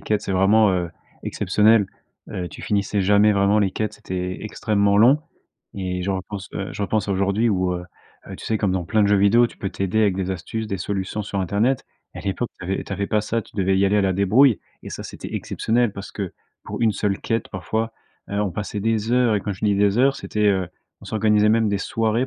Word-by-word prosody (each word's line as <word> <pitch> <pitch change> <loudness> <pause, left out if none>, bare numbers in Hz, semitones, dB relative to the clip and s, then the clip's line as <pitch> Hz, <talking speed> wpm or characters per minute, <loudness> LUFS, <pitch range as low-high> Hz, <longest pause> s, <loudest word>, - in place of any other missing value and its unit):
quêtes, 105 -1 0
c'est - - -3
vraiment, 100 +3 +4
heu, 90 -2 -1 0.3
exceptionnel. 105 +2 +3 0.4
Heu, 90 -1 -4
tu - - -11
finissais 100 0 0
jamais 105 +2 +5
vraiment 100 +1 +3
les 100 -2 +2
quêtes, 110 +1 -2
c'était 90 -1 -4
extrêmement 100 -1 +1
long, 125 +7 +6 0.6
et 90 -2 -3
je 95 - -1
repense, 95 +1 -5
heu, 100 - -4
je - - -4
repense 105 0 -1
à - - +1
aujourd'hui 100 +4 +1
où, 95 -3 +1
heu 90 0 -5 0.4
heu, - - -7
tu - - -11
sais, 110 - 0
comme 100 -3 +1
dans 95 -2 -1
plein 110 +6 +2
de - - +4
jeux 105 - +4
vidéo, 100 +5 +5
tu - - -15
peux 95 - -3
t'aider 100 +3 -1
avec 100 -3 +2
des 95 -1 -2
astuces, 110 +5 -5
des 100 - -3
solutions 100 +3 -3
sur 100 -1 -3
internet. 105 +8 +1 0.3
À - - -7
l'époque, 100 +5 -2
tu - - -8
avais 95 +2 -2
tu - - -8
avais 100 +1 -2
pas 105 - +1
ça, 110 +2 -2
tu - - -21
devais 95 -1 +2
y 100 - +3
aller 100 +1 +3
à - - +4
la 95 -1 +2
débrouille. 105 +6 +4 0.2
Et - - -8
ça, - - -6
c'était - - -8
exceptionnel, 120 -1 0
parce 100 -1 -8
que 100 -4 -5 0.3
pour - - -6
1 115 - +4
seule 100 -1 -1
quête, 115 -2 -2
parfois, 110 +5 -3 0.4
heu, 100 0 -1
on 105 -2 0
passait 105 +3 -4
des 110 +1 0
heures. 125 -3 +3
Et - - -1
quand 100 - -3
je 95 - -6
dis 100 -1 +3
des 100 +2 +2
heures, 135 +2 +4
c'était, 105 -5 -1
heu, 95 -2 +1 0.3
on - - -14
s'organisait 105 -1 +2
même 110 0 +3
des 100 -1 0
soirées 115 +4 0
100 Hz, 235 wpm, -22 LUFS, 95-110 Hz, 0.6 s, long